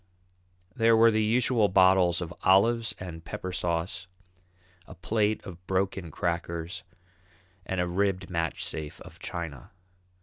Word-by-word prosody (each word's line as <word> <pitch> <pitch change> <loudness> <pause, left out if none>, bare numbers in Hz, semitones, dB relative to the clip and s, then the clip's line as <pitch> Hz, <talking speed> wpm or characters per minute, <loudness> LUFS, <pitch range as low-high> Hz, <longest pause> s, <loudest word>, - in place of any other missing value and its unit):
There 115 0 +4
were 115 +1 +6
the 110 0 +2
usual 115 0 +3
bottles 95 -2 +4
of 85 0 -5
olives 115 +5 +3
and 85 -3 -7
pepper 90 +2 -5
sauce, 85 +1 -2 0.8
a 95 - -11
plate 105 +4 0
of 90 -3 -10
broken 95 -2 -1
crackers, 85 +2 -3 0.9
and 95 - -2
a 90 - +2
ribbed 95 0 0
match 85 -2 -2
safe 75 -1 -6
of - - -13
china. 85 -5 -6
95 Hz, 130 wpm, -28 LUFS, 85-105 Hz, 0.9 s, were